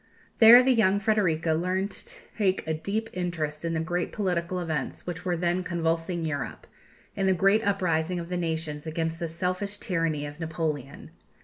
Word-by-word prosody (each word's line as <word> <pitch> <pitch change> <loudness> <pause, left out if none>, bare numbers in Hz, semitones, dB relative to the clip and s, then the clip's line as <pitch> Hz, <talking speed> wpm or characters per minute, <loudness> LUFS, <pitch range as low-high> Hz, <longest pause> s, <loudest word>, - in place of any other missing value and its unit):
There 235 +2 +10
the 260 0 +4
young 200 -4 +3
Frederika 180 -7 +1
learned 185 +4 -1
to 485 +1 -8 0.2
take 195 -4 +1
a 160 - -1
deep 205 +8 -3
interest 170 -4 -3
in 165 -1 -1
the - - 0
great 175 +2 -2
political 180 -3 -1
events 155 -6 -3
which 175 0 -5
were 180 -2 0
then 175 +1 0
convulsing 165 0 -1
Europe 150 -3 -4 0.5
in 195 -1 0
the 190 - +4
great 195 +4 +4
uprising 180 -3 0
of 170 - -6
the 180 - -2
nations 160 -3 -3
against 165 +1 -2
the 170 - -2
selfish 185 +5 -2
tyranny 165 -5 -1
of 145 +2 -8
Napoleon. 160 - -4
175 Hz, 175 wpm, -27 LUFS, 160-190 Hz, 0.5 s, There